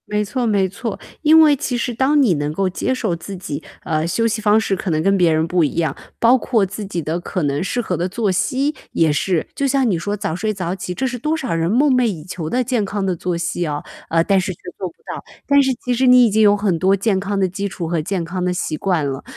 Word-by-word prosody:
没 210 0 -1
错 240 +4 -2
没 200 -3 +2
错， 200 +3 -5 0.2
因 315 +1 +6
为 300 -2 +6
其 255 -3 -2
实 245 +1 -2
当 270 +5 +3
你 230 -9 +4
能 145 -1 -2
够 190 +5 0
接 185 +7 -1
受 220 -9 -1
自 190 +3 -8
己， 155 -4 -6 0.2
呃， 155 0 -1
休 230 +7 0
息 220 -1 -2
方 210 0 +4
式 210 -3 0
可 190 - -4
能 155 -2 +1
跟 195 +2 +3
别 175 -3 +4
人 160 +1 +1
不 175 0 +2
一 145 - -1
样， 160 -5 0 0.2
包 235 +3 +5
括 230 -5 +1
自 205 +2 -6
己 180 -3 -3
的 160 +3 -2
可 175 0 -3
能 145 +1 0
适 245 - -2
合 220 -6 -1
的 175 +3 -2
作 205 +1 0
息， 260 - 0 0.2
也 160 -2 +2
是。 170 +2 0
就 280 - 0
像 270 -2 +2
你 185 - +1
说 205 +4 -3
早 160 -5 -3
睡 215 +4 -1
早 180 -3 -3
起， 185 -1 -5
这 265 - -2
是 250 0 -4
多 305 +6 0
少 265 - -3
人 165 0 0
梦 270 +4 +4
寐 250 -1 +3
以 180 -9 -2
求 170 -3 -5
的 250 +6 +1
健 245 -3 0
康 200 0 -2
的 185 -2 0
作 175 +1 -2
息 175 +1 -2
啊， 150 -1 -3 0.3
呃， 165 0 +3
但 195 +2 +3
是 190 - -3
却 - - -21 0.2
做 185 - -3
不 - - -21
到， - - -6 0.2
但 280 0 +5
是 265 -1 +2
其 250 - +1
实 255 +2 +2
你 250 -1 +7
已 - - +3
经 220 +2 +3
有 205 -1 +5
很 200 -4 0
多 190 +3 +3
健 200 0 0
康 200 +1 -2
的 190 - +2
基 200 +3 -3
础 180 -3 -5
和 165 -1 0
健 180 +1 -2
康 180 +2 -4
的 180 - +1
习 165 -3 -2
惯 165 -3 0
了。 135 0 -4
195 Hz, 295 characters per minute, -19 LUFS, 170-235 Hz, 0.3 s, 你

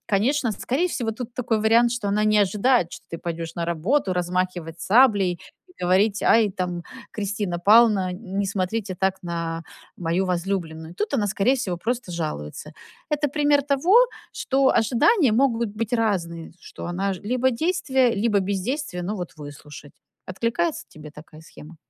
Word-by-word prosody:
Конечно, 235 +5 +1
скорее 275 - -1
всего 235 -9 -2
тут 235 +1 -7
такой 230 -3 0
вариант, 230 +2 +4
что 235 -4 -3
она 210 +1 +1
не 215 0 +3
ожидает, 205 -1 +1
что - - -10
ты 165 - -6
пойдешь 165 -1 -5
на 170 - -1
работу 185 - 0
размахивать 180 -2 -2
саблей, 200 -6 +4 0.4
говорить: 195 +4 +2
"Ай, 225 -2 +4
там 180 -2 -4 0.3
Кристина 200 -4 -3
Пална, 205 0 +5
н 190 0 -6
не 200 - +1
смотрите 195 +1 -2
так 190 +1 -1
на 170 -1 -4 0.3
мою 175 +2 -1
возлюбленную". 170 -3 -3
Тут 210 +8 -2
она 215 -6 +1
скорее 205 +5 +2
всего 185 -7 -3
просто 225 0 -3
жалуется. 155 - -5 0.4
Это 295 0 0
пример 290 0 +2
того, 285 +7 +2 0.4
что 270 0 +2
ожидания 245 - +3
могут 235 -2 +2
быть 215 +2 -4
разные, 180 -8 -1
что - - -10
она 190 +3 -1
ж, 180 - -10
либо 255 +3 +1
действие, 265 -3 +1
либо 215 -3 +2
бездействие, 195 - -3
но 195 +4 -3
вот 180 -3 -6
выслушать. 145 0 -11 0.3
Откликается 235 - -2
тебе 155 0 -12
такая 155 +1 -14
схема? 160 +1 -14
200 Hz, 155 wpm, -23 LUFS, 175-240 Hz, 0.4 s, Пална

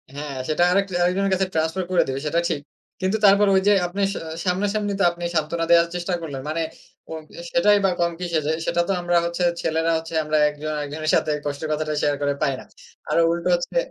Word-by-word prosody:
হ্যাঁ, 145 -1 -5
সেটা 155 +3 +2
আরেক 200 +1 +3 0.2
আরেকজনের 195 +2 +1
কাছে 190 0 +1
ট্রান্সফার 160 +4 0
করে 180 - +4
দিবে, 135 0 -2
সেটা 165 +3 +1
ঠিক। 145 - -2 0.4
কিন্তু 190 +4 +1
তারপর 200 +1 +6
ওই 190 - +4
যে 205 - +6
আপনি 195 +3 -4
স - - -8 0.3
সামনা 185 +3 +1
সামনি 210 -1 -1
তো - - +3
আপনি 175 0 -9
সান্ত্বনা 165 +2 0
দেওয়ার 170 0 +6
চেষ্টা 175 +1 -2
করলেন। 140 -5 -6
মানে 160 +2 -1 0.5
ও - - -4 0.3
এ - - -6
সেটাই 205 +4 +4
বা - - +4
কম 170 0 +2
কিসে। 170 -3 -1
যে 155 - +2
সেটা 175 - +1
তো - - 0
আমরা 175 0 +2
হচ্ছে 170 +1 -2 0.2
ছেলেরা 160 +1 0
হচ্ছে 165 +1 -7
আমরা 155 0 0
একজন 150 +1 -5
আরেকজনের 150 +2 -2
সাথে 155 - +1
কষ্টের 145 +2 -3
কথাটা 155 0 -2
শেয়ার 145 -1 +1
করে 145 0 +1
পাই 145 -3 +2
না। - - -12 0.4
আরও 170 - +3
উল্টো 170 +1 -1
হচ্ছে 175 - -4
170 Hz, 220 wpm, -23 LUFS, 155-185 Hz, 0.5 s, তারপর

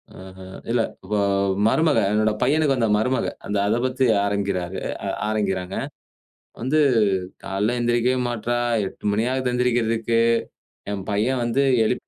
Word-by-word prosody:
அ - - -12 0.2
அ - - -10 0.3
இல்ல! 120 -1 +2 0.3
வ - - +2 0.5
மருமக 155 +3 +3 0.2
"என்னோட 110 0 +2
பையனுக்கு 145 +1 +2
வந்த 115 -3 +1
மருமக" 125 +4 0 0.2
அந்த 105 - -1
அதப் 115 +4 +1
பத்தி 130 +1 +1 0.2
ஆரம்பிக்கிறாரு 100 -3 -2 0.3
அ - - -2 0.2
ஆரம்பிக்கிறாங்க. 95 -3 -2 0.9
வந்து, 135 +6 +1 0.7
"காலையில 105 +5 -1
எந்திரிக்கவே 120 +2 +1
மாட்றா! 120 0 -2 0.3
8:00 - - -12
மணியாகுது 125 +4 0
எந்திரிக்கிறதுக்கு, 115 -2 +1 0.7
என் 100 -1 -4
பையன் 115 +6 0
வந்து 120 +4 +1 0.2
எழுப்பி 125 - -1
115 Hz, 130 wpm, -23 LUFS, 105-125 Hz, 0.9 s, மருமக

